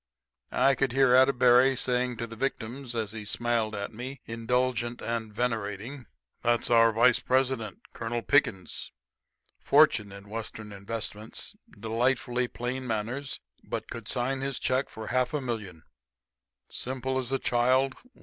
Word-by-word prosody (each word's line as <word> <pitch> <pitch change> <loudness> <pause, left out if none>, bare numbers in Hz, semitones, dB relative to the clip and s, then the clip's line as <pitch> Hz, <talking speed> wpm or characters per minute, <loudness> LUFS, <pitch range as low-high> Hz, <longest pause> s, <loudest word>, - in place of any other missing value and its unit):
I 135 - +5
could 135 -2 0
hear 135 -2 +5
Atterbury 130 0 +6
saying 125 -1 +1
to 115 - -3
victims, 120 +1 -4
as 110 -3 -2
he 110 -1 -6
smiled 115 0 0
at 100 +2 -4
me, 130 +4 -6
indulgent 120 +1 -1
and 115 -2 -3
venerating, 115 +2 -3 0.3
"That's 120 0 +1
our 115 -1 +6
vice 120 +2 +4
president, 130 -5 0
Colonel 115 0 -3
Pickens... 105 -10 +1 0.7
fortune 105 -2 +4
in 100 +1 -11
Western 110 0 -6
investments... 105 +2 -5 0.2
delightfully 120 +2 0
plain 125 +2 -4
manners, 120 +5 -3 0.2
but... - - -5
could 115 -3 -7
sign 130 +1 0
his 135 0 -2
check 130 +1 0
for 110 - -8
half 125 +4 0
a - - +1
million... 110 - -5 0.8
simple 130 +1 -3
as 130 -1 -3
a 135 - +2
child 130 +1 +2
120 Hz, 135 wpm, -28 LUFS, 110-130 Hz, 0.8 s, Atterbury